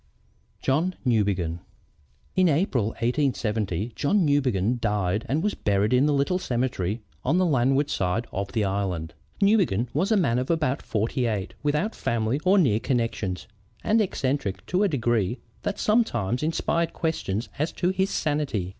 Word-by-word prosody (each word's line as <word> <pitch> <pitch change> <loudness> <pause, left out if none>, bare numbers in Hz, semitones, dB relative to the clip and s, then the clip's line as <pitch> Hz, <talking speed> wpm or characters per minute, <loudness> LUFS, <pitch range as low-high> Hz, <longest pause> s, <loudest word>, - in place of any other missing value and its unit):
JOHN 165 +7 +1
NEWBEGIN 100 -8 +1 0.8
"In 185 -2 +4
April, 145 - +1
1870, 115 - -1
John 185 +5 +2
Newbegin 125 -6 +1
died 105 -1 0
and 150 +6 +1
was 210 - +1
buried 100 +2 +1
in 130 +4 +4
the - - +2
little 140 +6 +1
cemetery 120 - -2 0.2
on 145 +7 +2
the 185 - +3
landward 135 -1 +2
side 95 +6 0
of 100 +1 -3
the 110 - +1
island. 95 -5 -2 0.3
Newbegin 180 - +3
was 180 +9 0
a 220 - +5
man 125 -10 +2
of 130 - -3
about 155 -6 +1
forty 115 +3 -1
eight, 105 -4 -2
without 150 +9 0
family 115 +3 -1
or 190 +2 +4
near 125 - +3
connections, 115 -7 -2 0.4
and 220 +1 +3
eccentric 135 - -2
to 185 +2 0
a 205 - +4
degree 120 - 0 0.2
that 205 - -2
sometimes 125 - +1
inspired 165 +1 0
questions 120 - -2
as 155 +3 0
to 175 - 0
his 190 +1 0
sanity. 145 - -1
125 Hz, 155 wpm, -25 LUFS, 105-160 Hz, 0.8 s, a